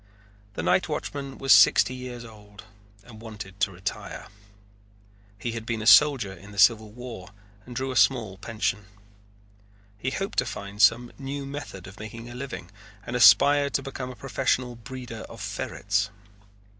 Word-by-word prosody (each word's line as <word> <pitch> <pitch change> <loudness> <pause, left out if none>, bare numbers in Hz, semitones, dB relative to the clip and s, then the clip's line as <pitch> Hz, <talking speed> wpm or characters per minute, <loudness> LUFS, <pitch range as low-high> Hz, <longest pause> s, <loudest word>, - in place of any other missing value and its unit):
The - - -3
night - - +2
watchman 140 -2 -4
was 135 -1 +5
sixty 130 - +6
years 125 -2 -7
old 105 -2 -14 0.4
and 110 -2 -14
wanted 105 -4 -9
to 100 0 +1
retire. 95 +3 -6 1.1
He 115 +4 -4
had 115 -1 -5
been 115 -1 -3
a - - -6
soldier 130 -6 +6
in 95 +3 -13
the 100 - -12
Civil 110 +1 +5
War 115 -5 -9 0.4
and 125 - -9
drew 130 +1 -2
a - - -5
small 110 -8 +2
pension. 105 -1 -2 1.1
He 130 - -1
hoped 195 +9 -2
to 125 - +1
find 100 -3 -6
some 120 +2 +4
new 140 +1 -5
method 140 -10 -7
of 95 +2 -12
making 115 +2 -8
a - - -8
living 125 -8 -7 0.3
and 120 - -5
aspired 140 +6 +6
to 140 - 0
become 130 -2 -6
a 130 - -8
professional 125 -2 -1
breeder 120 -1 -8
of - - -11
ferrets. 100 0 -2
115 Hz, 160 wpm, -26 LUFS, 105-130 Hz, 1.1 s, sixty